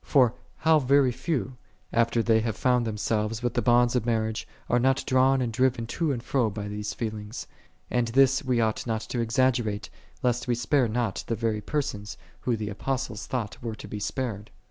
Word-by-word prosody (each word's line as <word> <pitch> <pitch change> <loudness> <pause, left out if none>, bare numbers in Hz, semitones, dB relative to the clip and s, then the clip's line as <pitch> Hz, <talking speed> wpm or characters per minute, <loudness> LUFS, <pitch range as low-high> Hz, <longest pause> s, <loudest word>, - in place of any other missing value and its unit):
For 125 -5 +4 0.2
how 160 -1 +4
very 135 -1 +4
few, 130 -2 -2 0.4
after 115 0 +2
they 110 -1 +4
have 110 -1 -2
bound 125 -2 +3
them 110 -1 -3
selves 110 +2 -1
with 120 - 0
the 120 - +1
bonds 120 +2 +4
of 125 - +2
marriage, 110 -1 -1 0.2
are 120 - +3
not 130 +2 +2
drawn 130 0 +3
and 115 -2 -3
driven 125 -1 +1
to 155 +6 -1
and 120 -3 -3
fro 125 -5 +1
by 105 0 -5
these 105 0 -4
feel 110 -2 -3
ings? 105 +3 -7 0.5
And 120 -1 +1
this 135 +3 +4
we 125 -3 +1
ought 110 +1 0
not 110 -1 -1
to 120 - -4
exaggerate, 115 -3 +1 0.3
lest 125 0 +1
we 120 - +2
spare 125 +2 +2
not 115 -2 -1
the 115 - 0
very 110 -1 -1
persons, 105 -7 -3 0.2
who 120 -2 0
the 105 -1 -3
Apostle 130 +3 -2
thought 115 0 -4
were 115 -2 -4
to - - -10
be 105 - -5
spared. 110 -1 -3
120 Hz, 200 wpm, -27 LUFS, 110-130 Hz, 0.5 s, For